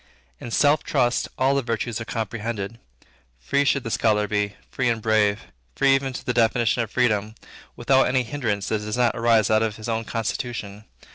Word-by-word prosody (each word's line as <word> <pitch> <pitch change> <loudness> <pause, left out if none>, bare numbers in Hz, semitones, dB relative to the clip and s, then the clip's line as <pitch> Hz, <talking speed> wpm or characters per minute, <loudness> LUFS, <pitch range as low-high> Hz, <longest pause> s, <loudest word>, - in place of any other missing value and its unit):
In - - -7
self 145 +5 +3
trust, 125 -4 +1
all 135 +1 +3
the 140 - +1
virtues 115 -1 -3
are - - -5
comprehended. 110 -1 -4 0.6
Free 140 - +1
should 140 -1 +1
the 115 - -5
scholar 105 -2 +2
be, 105 -1 -1 0.2
free 125 -2 0
and 115 -1 0
brave. 110 -2 +2 0.3
Free 135 - +4
even 135 0 0
to 125 - -7
the 125 - 0
definition 115 0 +2
of 115 - -3
freedom, 110 -3 0 0.4
"without 130 +3 +3
any 130 -1 +1
hindrance 110 -6 -3
that 110 - 0
does 105 +2 -4
not 120 -2 +2
arise 115 -3 +3
out 110 0 +4
of 110 -2 -1
his 110 +1 -8
own 115 0 -2
constitution." 110 -2 -4
115 Hz, 190 wpm, -23 LUFS, 105-125 Hz, 0.6 s, Free